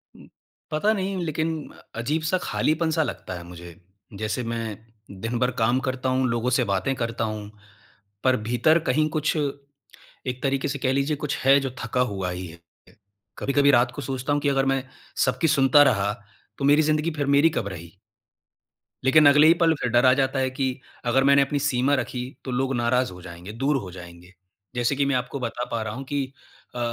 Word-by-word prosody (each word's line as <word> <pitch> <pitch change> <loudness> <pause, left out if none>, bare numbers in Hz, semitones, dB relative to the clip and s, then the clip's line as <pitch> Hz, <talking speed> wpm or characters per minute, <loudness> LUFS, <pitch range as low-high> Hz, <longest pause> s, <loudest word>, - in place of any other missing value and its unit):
उम, - - -15 0.4
पता 180 +8 +2
नहीं 195 -1 -2
लेकिन 155 +1 -1 0.5
अजीब 150 +8 -1
सा 185 - +3
खालीपन-सा 160 0 +1
लगता 90 - -6
है 85 - -9
मुझे। 85 -1 -11 0.4
जैसे 110 +3 -2
मैं 115 -2 -4 0.4
दिन 115 +2 -2
भर 125 0 +2
काम 120 +3 +3
करता 130 0 -2
हूँ, 130 0 +1
लोगों 120 +1 0
से - - +2
बातें 100 +7 0
करता 115 -1 -2
हूँ, 105 -1 -4 0.7
पर 130 -1 +3
भीतर 155 +7 +3
कहीं 155 +4 +2
कुछ 155 0 0 0.9
एक 125 0 -3
तरीके 135 +1 0
से 140 -1 -3
कह 130 0 +1
लीजिए 140 +2 0
कुछ 150 -1 -3
है, 135 +1 +7
जो 135 -2 -3
थका 125 +2 0
हुआ 95 -2 -3
ही 90 +1 -5
है। 85 +1 -13 0.8
कभी-कभी 140 +1 +3
रात 120 0 +3
को 145 - -5
सोचता 130 +3 -2
हूँ 145 - 0
कि 145 - +1
अगर 135 -1 +1
मैं 135 -1 +1 0.4
सबकी 160 - +1
सुनता 140 0 +6
रहा, 105 -6 +2 0.4
तो 140 - -2
मेरी 145 +2 +5
ज़िंदगी 155 +2 +1
फिर 145 -2 -2
मेरी 140 +3 +5
कब 110 -9 -3
रही? 85 +1 -10 1.1
लेकिन 145 +2 +6
अगले 150 +2 +6
ही 165 - +8
पल 165 -1 +5
फिर 125 - 0
डर 120 +1 +4
आ 130 - +7
जाता 135 0 0
है 130 0 +1
कि, 130 0 -2 0.3
अगर 135 +3 +3
मैंने 140 0 +5
अपनी 140 +1 0
सीमा 140 0 +2
रखी 125 -1 -3 0.2
तो 130 - -4
लोग 135 +1 0
नाराज 120 0 +1
हो 90 0 -11
जाएँगे, 90 +3 -9
दूर 135 +4 +1
हो 95 -7 -6
जाएँगे। 90 +1 -12 0.4
जैसे 120 +3 +1
कि 140 0 +1
मैं 140 -1 +1
आपको 125 +2 -3
बता 120 0 -3
पा 115 - -1
रहा - - -4
हूँ, 135 - -6
कि 140 0 -1 0.5
अ, - - -4
130 Hz, 200 wpm, -24 LUFS, 115-145 Hz, 1.1 s, ही